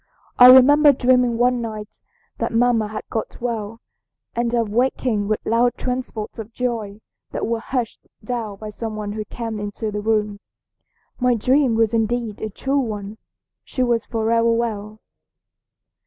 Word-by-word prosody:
I 250 - +11
remember 285 +3 +8
dreaming 250 -2 +2
one 245 0 +2
night 215 -2 -7 0.4
that - - -1
mamma 230 -2 +2
had 215 +1 -6
got 220 - -4
well, 230 -2 -4 0.5
and 235 0 0
of 230 -3 0
waking 235 -2 0
with 215 0 -2
loud 240 +2 +2
transports 250 -4 -4
of 220 +1 -7
joy 225 -4 -3 0.3
that - - -3
were 230 +1 -1
hushed 240 0 -4 0.2
down 220 -3 -4
by 215 +1 -7
some 220 +1 -5
one 210 -1 -4
who 215 +1 -4
came 225 -1 -5
into 205 +1 -4
the 210 0 -3
room. 210 -1 0 0.8
My 250 -1 +3
dream 255 +2 +2
was 225 0 +2
indeed 225 -1 -1
a 220 - -3
true 270 +7 -1
one. 215 -3 -5 0.4
She 255 - -2
was 235 -2 0
forever 230 0 +1
well. 215 -2 -3
230 Hz, 155 wpm, -21 LUFS, 215-245 Hz, 0.8 s, I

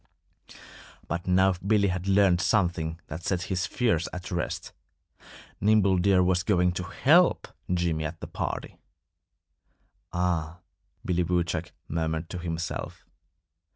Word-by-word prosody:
But 85 +1 -4
now 95 +1 +4
Billy 100 +3 +1
had 90 +1 -3
learned 95 -2 +4
something 85 -5 0
that 80 +3 -7
set 90 0 -1
his 90 -3 -1
fears 85 -9 0
at 90 0 -7
rest. 90 -1 -3 0.9
Nimble 100 -2 +3
Deer 95 0 +4
was 90 0 +2
going 90 -2 +2
to 90 +1 -4
help - - +3 0.2
Jimmy 85 -3 0
at 75 - -5
the - - -6
party. - - -5 1.3
"Ah!" 85 -1 -1 0.4
Billy 90 -1 +1
Woodchuck 85 -1 -1 0.2
murmured 80 0 -2
to 90 - -4
himself. 85 -1 -5
90 Hz, 120 wpm, -27 LUFS, 85-95 Hz, 1.3 s, now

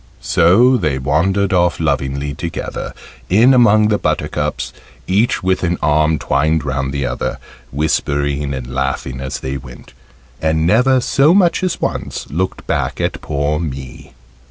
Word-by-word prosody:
So 115 - +4
they 75 - -1
wandered 95 +9 +1
off 90 -1 +2
lovingly 70 +1 -1
together, 85 +2 -5 0.3
in 115 +8 +5
among 110 -4 +5
the 105 - +1
buttercups, - - -2 0.3
each 100 +4 +1
with 95 0 +1
an 90 0 0
arm 75 +1 +2
twined 80 +1 0
round 70 +1 -2
the 70 -1 -2
other, 60 0 -3 0.3
whispering 70 -1 -1
and 65 -2 -5
laughing 65 -1 -3
as 70 +1 -5
they 65 +1 -3
went, 65 -2 -13 0.5
and 80 0 +1
never 125 +7 +3
so 145 +7 +3
much 175 -4 +3
as 185 -2 -1
once - - -3
looked 90 +5 -3
back - - -2
at - - -2
poor 75 +1 -1
me. 70 -5 -7
80 Hz, 145 wpm, -17 LUFS, 70-100 Hz, 0.5 s, in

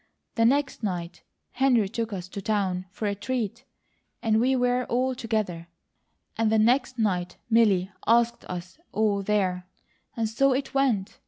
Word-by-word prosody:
The 230 - +2
next 275 +2 +1
night 180 -5 -4 0.3
Henry 245 -5 +3
took 225 +2 -3
us 185 -3 -5
to 200 - -6
town 190 -3 -1
for 205 +3 -4
a 200 - 0
treat, 235 +2 -3 0.6
and 220 -1 +3
we 260 +3 +3
were 250 0 +1
all 255 +2 0
together, 215 -9 -2 0.7
and 225 -1 +1
the 220 - +4
next 250 +4 +2
night 185 -5 -1
Milly 205 -5 +4 0.2
asked 235 +1 +3
us 180 - -7
all 210 -2 +1
there, 190 -3 0 0.5
and 225 -1 +1
so 265 +5 +2
it 270 +1 -3
went. 250 -8 0
220 Hz, 155 wpm, -26 LUFS, 195-245 Hz, 0.7 s, the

